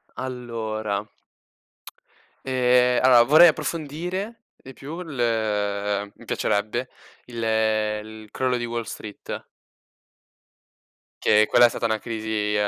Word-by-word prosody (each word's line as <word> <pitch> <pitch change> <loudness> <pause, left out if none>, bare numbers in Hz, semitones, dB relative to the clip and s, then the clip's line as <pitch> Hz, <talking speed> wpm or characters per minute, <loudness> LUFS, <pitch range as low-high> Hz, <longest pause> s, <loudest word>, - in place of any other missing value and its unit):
Allora 110 -5 -4 1.4
ehm, 125 -1 +3
allora 125 -2 +7
vorrei 155 +7 +8
approfondire 170 +8 -3
di 135 - -13
più 150 +6 -8
il 105 - -1
mi - - -16
piacerebbe 110 +5 -1 0.4
il 120 -1 -7
il 110 -1 -1
crollo 130 +1 -1
di 120 - -3
Wall 120 0 -3
Street. 105 -1 -8 1.8
Che 105 0 +4
quella 120 - +6
è 120 - +5
stata 115 - -4
una 110 -1 +1
crisi 110 -2 -2
a 105 0 +1
115 Hz, 110 wpm, -24 LUFS, 110-130 Hz, 1.8 s, vorrei